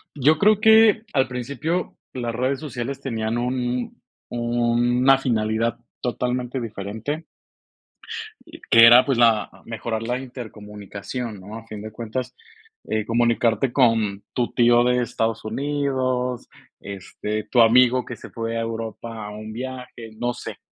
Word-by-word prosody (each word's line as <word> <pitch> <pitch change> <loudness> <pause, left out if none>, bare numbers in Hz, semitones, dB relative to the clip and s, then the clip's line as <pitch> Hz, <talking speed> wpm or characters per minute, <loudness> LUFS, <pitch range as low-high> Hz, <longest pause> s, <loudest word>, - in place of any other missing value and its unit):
Yo 150 +3 +4
creo 210 +2 +4
que, 220 0 +6
al 130 -2 +2
principio, 140 +8 -3 0.2
las 120 -2 -3
redes 130 +3 0
sociales 135 -2 -5
tenían 115 -2 -2
un 125 0 -2 0.3
una 120 +2 +3
finalidad 115 -2 0 0.2
totalmente 125 +1 -2
diferente. 110 +8 -5 1.2
Y 330 0 -13
que 115 0 +9
era, 120 +2 +9
pues, 135 -4 0
la 115 -3 +4
mejorar 115 0 -4
la 125 +2 -1
intercomunicación, 105 -2 -7
¿no?, 105 +4 -9
a 115 0 -10
fin 105 -2 -8
de 110 0 -8
cuentas, 120 +3 -5 0.5
eh, 110 -1 -1
comunicarte 115 +1 +2
con 110 -6 +2
tu 120 -1 -1
tío 120 0 +5
de 125 0 +2
Estados 115 -2 -2
Unidos, 130 0 -1 0.3
este, 100 +2 -5
tu 120 - +2
amigo 125 +2 +5
que 120 - -7
se - - -12
fue 115 0 -4
a - - 0
Europa 115 -1 -5
a 105 - -7
un 110 +1 -8
viaje, 125 -1 -7
no 120 0 0
sé, - - -8
120 Hz, 140 wpm, -23 LUFS, 110-130 Hz, 1.2 s, que